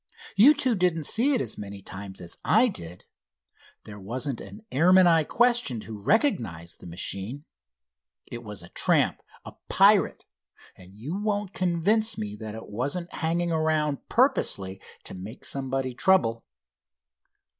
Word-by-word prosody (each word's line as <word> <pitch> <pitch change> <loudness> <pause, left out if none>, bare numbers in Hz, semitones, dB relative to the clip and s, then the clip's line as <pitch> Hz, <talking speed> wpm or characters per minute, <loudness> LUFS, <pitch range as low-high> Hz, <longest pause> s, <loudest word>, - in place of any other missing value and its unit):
You 275 +9 +7
two 265 -3 +2
didn't 180 -5 +1
see 255 - +2
it 245 - 0
as 115 - -4
many 100 -1 -8
times 95 0 -8
as 85 - -7
I 245 +3 +4
did. 90 - -6 0.8
There 105 -1 -11
wasn't 125 +6 -4
an 215 +1 -12
airman 185 +6 +5
I 165 -2 +4
questioned 235 - +1
who 110 -2 -9
recognized 105 - 0
the - - -12
machine. 100 - -2 0.8
It 120 0 -8
was 105 -5 -8
a 85 - -13
tramp, - - +2 0.2
a - - -9 0.2
pirate, - - +4 0.5
and 95 +1 -16
you 135 - -6
won't 205 -1 -2
convince 200 +6 +1
me 105 -1 -5
that 110 0 -7
it 110 - -9
wasn't 140 - -3
hanging 170 +1 -1
around 155 -3 -1
purposely 100 - +1 0.2
to - - -6
make 100 +7 -9
somebody 135 -1 -1
trouble." 120 -6 +2
140 Hz, 145 wpm, -26 LUFS, -, 0.8 s, You